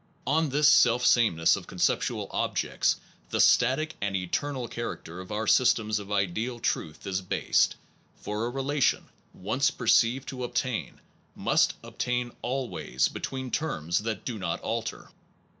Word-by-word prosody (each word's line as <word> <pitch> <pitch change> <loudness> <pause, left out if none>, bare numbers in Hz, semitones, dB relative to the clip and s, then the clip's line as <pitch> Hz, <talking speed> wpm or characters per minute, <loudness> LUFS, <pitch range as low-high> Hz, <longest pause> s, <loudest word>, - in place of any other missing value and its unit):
On 155 +4 +2
this 145 +2 +3
self 125 -4 +5
sameness 85 -11 +4
of - - -8
con - - -11
ness - - +4
of - - +2
ideal - - -3
ceptual - - -13
objects - - 0 0.3
the - - -2
static 135 +6 +3
and 100 -1 -1
eter 95 +10 -1
nal 130 -4 -4
character 95 -7 -6
of 95 - -11
our 105 +1 -2
systems 110 -2 +3
of 100 0 -9
ideal 105 +5 -1
truth 80 -8 -2
is 95 0 -1
based; 90 - +1 0.4
for 105 +2 -3
a - - -2
relation, 135 +2 0 0.2
once 125 +9 0
perceived 120 +2 +2
to 125 -2 -5
obtain, 125 0 -2 0.4
must - - +2
obtain 125 0 -2
always, 130 0 -1
between 130 -2 -5
terms 85 - -1
that 110 -2 -4
do 115 -4 -4
not 85 -3 -2
alter. 115 0 -4
120 Hz, 160 wpm, -27 LUFS, 100-130 Hz, 0.4 s, self